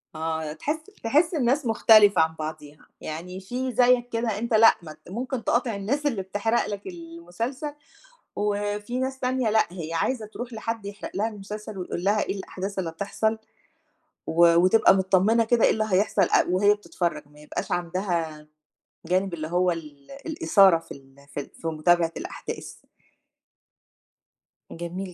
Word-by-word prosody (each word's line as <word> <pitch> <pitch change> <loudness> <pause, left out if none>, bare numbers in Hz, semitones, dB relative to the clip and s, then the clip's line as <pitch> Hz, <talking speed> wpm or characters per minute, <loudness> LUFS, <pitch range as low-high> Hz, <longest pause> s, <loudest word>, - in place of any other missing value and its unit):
آه 160 -1 -3
تحس 295 - -2 0.3
تحس 300 +9 +3
الناس 275 -1 +1
مختلفة 215 -4 +6
عن 160 0 +1
بعضيها، 155 -1 -7 0.2
يعني 175 +4 -6
في 250 +7 -4
زيك 245 0 +3
كده 230 -3 -1
أنت 235 +1 -3
لأ 225 +1 +7
م 155 -2 -9 0.2
ممكن 250 +1 -3
تقاطع 235 -2 +1
الناس 245 +10 -2
اللي 240 -9 0
بتحرق 205 +4 0
لك 205 -1 -6
المسلسل، 175 - -6 0.6
وفي 205 +3 -2
ناس 265 0 -3
تانية 255 -2 0
لأ 220 +1 +3
هي 165 -3 -6
عايزة 220 +7 -1
تروح 235 +3 -8
لحد 225 -1 -4
يحرق 205 +1 -7
لها 210 +3 +1
المسلسل 210 0 -8
ويقول 180 -1 -4
لها 205 +2 +2
إيه - - -3
الأحداث 195 +1 -5
اللي 175 -3 -2
هتحصل، 200 +6 -1 0.9
و 170 +1 +5
وتبقى 185 +5 +5
متطمّنة 195 +4 +3
كده 230 0 +2
إيه - - +4
اللي 215 0 0
هيحصل 195 +2 +2
أ - - +4
وهي 200 +3 +4
بتتفرّج، 170 -7 -3
ما 150 +1 -20
يبقاش 150 - -5
عندها 170 -3 -2 0.6
جانب 185 +2 0
اللي 155 -2 -4
هو 180 +2 +2
ال 150 -4 -8
الإثارة 190 - +4
في 165 - -18
ال 135 -1 -12 0.2
في - - -3
ال 140 - -7
في 165 - -6
متابعة 165 +1 +2
الأحداث. - - -7 2.0
جميل 180 +2 -6
195 Hz, 155 wpm, -25 LUFS, 170-225 Hz, 2.0 s, لأ